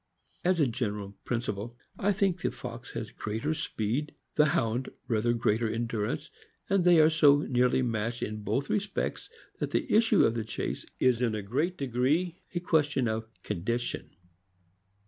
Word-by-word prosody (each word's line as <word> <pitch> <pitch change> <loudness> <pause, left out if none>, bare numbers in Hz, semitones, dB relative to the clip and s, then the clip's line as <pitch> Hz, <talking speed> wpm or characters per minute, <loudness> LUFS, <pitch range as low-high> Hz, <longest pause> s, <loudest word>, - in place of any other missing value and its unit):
As 180 -1 +2
a 150 - +5
gen 120 -3 -1
eral 100 -1 -7
principle, 120 -1 -3 0.2
I 205 - +3
think 190 -3 +1
the - - +1
fox 120 0 -8
has 110 - -5
rather - - -32
greater 115 +9 -1
speed, 130 +1 -2 0.2
the 150 - +5
Hound 120 -2 0 0.2
rather 115 0 +2
greater 115 -1 +1
endurance; 115 -1 -2 0.4
and 195 -2 +2
they 175 -2 +6
are 155 +1 +6
so 145 -2 +6
nearly 125 -1 +2
matched 115 0 -1
in 105 0 -4
both 110 +7 -1
respects 200 -1 -2 0.3
that - - -1
the 300 -6 -1
issue 220 -2 +5
of 115 - +2
the 115 -1 -2
chase 110 - -4
is 125 -2 +3
in 115 -3 +1
a 105 - -3
great 150 - -1
degree 140 +7 0
a - - +2
question 145 -7 +2
of 110 0 -2 0.2
condition. 110 +5 -2
125 Hz, 165 wpm, -29 LUFS, 110-155 Hz, 0.4 s, they